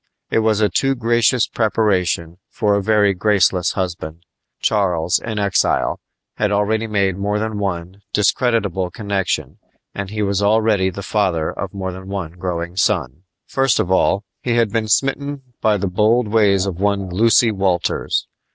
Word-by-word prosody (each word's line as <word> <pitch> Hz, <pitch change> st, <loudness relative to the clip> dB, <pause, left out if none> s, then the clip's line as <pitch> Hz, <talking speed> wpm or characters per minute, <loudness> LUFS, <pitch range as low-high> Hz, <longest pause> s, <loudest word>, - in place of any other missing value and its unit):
It -, -, +3 dB
was 110 Hz, -1 st, +1 dB
a 105 Hz, -, +4 dB
too 135 Hz, +5 st, 0 dB
gracious 120 Hz, 0 st, +2 dB
preparation 95 Hz, -6 st, 0 dB
for 105 Hz, -3 st, 0 dB
a 100 Hz, -, +1 dB
very 105 Hz, -1 st, +3 dB
graceless 95 Hz, -2 st, +2 dB
husband. 85 Hz, -3 st, -4 dB, 0.4 s
Charles, 90 Hz, -5 st, +1 dB
in 110 Hz, -2 st, -5 dB
exile, 100 Hz, -2 st, +1 dB, 0.4 s
had 105 Hz, -1 st, +1 dB
already 110 Hz, +2 st, 0 dB
made 100 Hz, -3 st, 0 dB
more 105 Hz, +1 st, -1 dB
than 110 Hz, -1 st, -3 dB
one 95 Hz, 0 st, -4 dB
discreditable 100 Hz, -4 st, +1 dB
connection 100 Hz, -1 st, -3 dB, 0.3 s
and 100 Hz, -1 st, -5 dB
he 105 Hz, 0 st, -2 dB
was 100 Hz, 0 st, 0 dB
already 105 Hz, -2 st, +2 dB
the 100 Hz, +2 st, -7 dB
father 95 Hz, -6 st, 0 dB
of -, -, -6 dB
more 95 Hz, -1 st, -3 dB
than 95 Hz, +1 st, -10 dB
one 95 Hz, -5 st, -4 dB
growing 85 Hz, -1 st, -4 dB
son. 85 Hz, -5 st, 0 dB, 0.2 s
First 135 Hz, -2 st, +1 dB
of 90 Hz, -, -1 dB
all, 95 Hz, +1 st, +2 dB, 0.2 s
he 120 Hz, -2 st, -1 dB
had 115 Hz, -3 st, +2 dB
been 110 Hz, 0 st, -1 dB
smitten 135 Hz, +4 st, 0 dB, 0.2 s
by 110 Hz, -1 st, +3 dB
the 100 Hz, -, -2 dB
bold 110 Hz, +5 st, +2 dB
ways 100 Hz, -3 st, +3 dB
of 95 Hz, -3 st, -4 dB
one 100 Hz, -1 st, 0 dB
Lucy 115 Hz, +4 st, +4 dB
Walters. 95 Hz, -4 st, 0 dB
100 Hz, 160 wpm, -19 LUFS, 95-110 Hz, 0.4 s, a